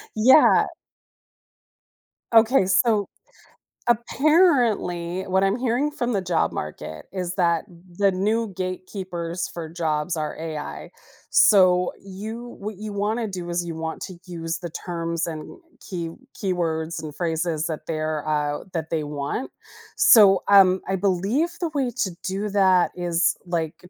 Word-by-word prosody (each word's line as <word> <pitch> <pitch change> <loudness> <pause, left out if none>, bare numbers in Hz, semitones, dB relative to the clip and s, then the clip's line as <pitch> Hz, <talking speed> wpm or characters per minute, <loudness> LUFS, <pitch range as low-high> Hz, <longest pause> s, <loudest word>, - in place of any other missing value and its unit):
Yeah. 255 +7 +6 1.7
Okay, 225 -2 +5
so 205 +1 +2 0.8
apparently, 235 - +2
what 190 0 +1
I'm 195 +2 +2
hearing 255 +4 0
from 245 -5 -2
the 200 - +1
job 175 -3 0
market 75 +1 -6
is 180 -1 -3
that 170 -3 +2 0.3
the 200 -1 +3
new 210 +2 -1
gatekeepers 185 -2 -4
for 165 -2 -7
jobs 160 -1 -2
are 155 -1 -3
AI. 155 -2 -6 0.4
So, 180 -3 +5
you 220 +5 -8
what 210 +1 -5
you 210 +2 -7
want 210 +3 -1
to 225 - -2
do 180 -3 -6
is 175 0 -1
you 165 - -5
want 160 0 -5
to 185 - -7
use 165 -2 -4
the 175 0 -6
terms 170 0 -3
and 155 - -7 0.2
key 170 -4 -5 0.3
keywords 165 -5 -2
and 150 -2 -8
phrases 165 -2 -1
that 160 -2 -5
they're, 155 -1 -2
uh, 150 -1 -1
that 160 -1 -3
they 160 -2 -1
want. 145 - -4 0.4
So, 195 -4 +7
um, 190 -2 +6
I 190 - +1
believe 200 - +1
the 335 - 0
way 270 -3 0
to 190 - -3 0.2
do 200 +2 -2
that 190 -3 +3
is, 175 0 +1
like, 165 -2 -2
180 Hz, 140 wpm, -23 LUFS, 165-205 Hz, 1.7 s, So